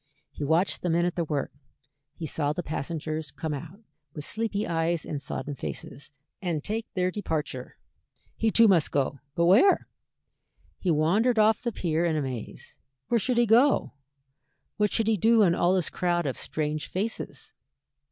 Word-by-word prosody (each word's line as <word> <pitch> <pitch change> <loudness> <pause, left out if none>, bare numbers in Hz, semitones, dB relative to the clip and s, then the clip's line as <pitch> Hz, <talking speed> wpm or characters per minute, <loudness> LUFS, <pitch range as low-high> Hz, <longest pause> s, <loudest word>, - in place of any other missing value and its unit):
He - - -6
watched 160 +6 +1
the 180 - -1
men 170 +1 +2
at 175 - 0
their 170 - -1
work, 145 -3 -2 0.6
he 165 - -6
saw 145 -1 -1
the 175 - -4
passengers 155 0 -4
come 155 +1 -4
out, 165 +8 -8 0.3
with 150 -2 -5
sleepy 215 -1 -2
eyes 165 0 0
and 145 -2 -4
sodden 145 +1 -4
faces, 140 +1 -7 0.3
and 170 -6 -2
take 220 +2 -3
their 185 0 +1
departure. 160 -7 -4 0.6
He 225 - +1
too 230 +1 +6
must 175 -6 +4
go 140 -1 -1 0.2
but 170 - +2
where? 220 - +5 0.9
He 185 - -1
wandered 185 +10 +3
off 215 0 +4
the 240 - -2
pier 165 -5 -1
in 165 -2 +1
a 155 - 0
maze. 125 -5 -6 0.3
Where 235 - +3
should 250 +3 0
he 240 - +5
go? 240 +6 +4 0.8
what 210 -1 +2
should 225 - +1
he 220 -1 +2
do 225 +3 +5
in 175 -4 +4
all 175 +2 +2
this 180 -5 0
crowd 175 -2 0
of 135 - -1
strange 155 0 -3
faces? 215 +5 -4
175 Hz, 170 wpm, -27 LUFS, 155-215 Hz, 0.9 s, too